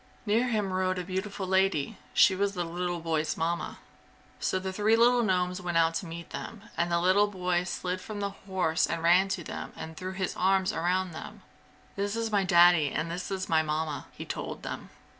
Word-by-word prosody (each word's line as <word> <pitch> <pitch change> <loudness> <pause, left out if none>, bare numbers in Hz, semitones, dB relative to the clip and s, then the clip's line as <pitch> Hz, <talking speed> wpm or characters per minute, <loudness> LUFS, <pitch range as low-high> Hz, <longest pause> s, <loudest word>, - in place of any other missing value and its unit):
Near 225 +4 +2
him 210 -5 0
rode 185 0 0
a 180 - -2
beautiful 190 +2 -4
lady. 190 -2 +1 0.2
She 195 -2 +5
was 200 +1 0
the 175 - -1
little 175 +1 -3
boy's 160 -1 -1
Mamma. 170 +1 -2 0.6
So - - 0
the 190 0 -4
three 215 +3 +3
little 240 +1 +5
gnomes 180 -3 0
went 175 -2 -1
out 165 0 +4
to 170 - -6
meet 170 +1 -8
them, 220 -2 -7
and 170 +1 0
the 170 - +3
little 190 +4 +4
boy 180 -3 -1
slid 185 0 -3
from 210 +1 -6
the 200 0 -2
horse 190 -5 0
and 165 -1 -3
ran 180 +3 +5
to 190 -3 -3
them - - -6
and 160 0 -7
threw 185 +3 -5
his 190 -1 -2
arms 190 0 +2
around 180 +2 0
them. 160 - -9 0.5
"This 200 +1 -1
is 230 -1 -2
my 200 -2 +3
Daddy, 175 -4 +6
and 165 +4 -2
this 180 +4 -4
is 190 -1 -3
my 160 -1 +3
Mamma!" 155 -1 -2
he - - -8
told - - -5
them. - - -6
185 Hz, 205 wpm, -29 LUFS, 170-195 Hz, 0.6 s, Daddy